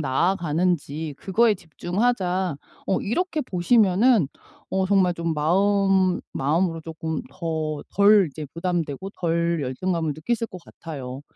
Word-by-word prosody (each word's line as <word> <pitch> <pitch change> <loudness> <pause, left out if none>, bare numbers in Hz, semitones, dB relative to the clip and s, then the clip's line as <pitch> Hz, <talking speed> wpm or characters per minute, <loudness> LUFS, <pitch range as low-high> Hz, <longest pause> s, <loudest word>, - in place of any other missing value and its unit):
나아가는지 160 0 0
그거에 215 +6 +2
집중하자.' 180 - -1 0.3
어 190 - +1
이렇게 320 - -1
보시면은 205 - +3 0.4
어 190 0 +1
정말 190 -2 +3
좀 170 -1 -2
마음 190 +3 +2
마음으로 165 +4 0
쪼끔 160 +3 -4
더 160 -3 -3
덜 200 -1 +6
이제 150 +2 -7
부담되고 170 0 -2
덜 170 -1 0
열등감을 160 +4 -1
느끼실 230 +10 -2
것 180 -2 -10
같아요. 135 -6 -8
175 Hz, 275 characters per minute, -24 LUFS, 160-195 Hz, 0.4 s, 덜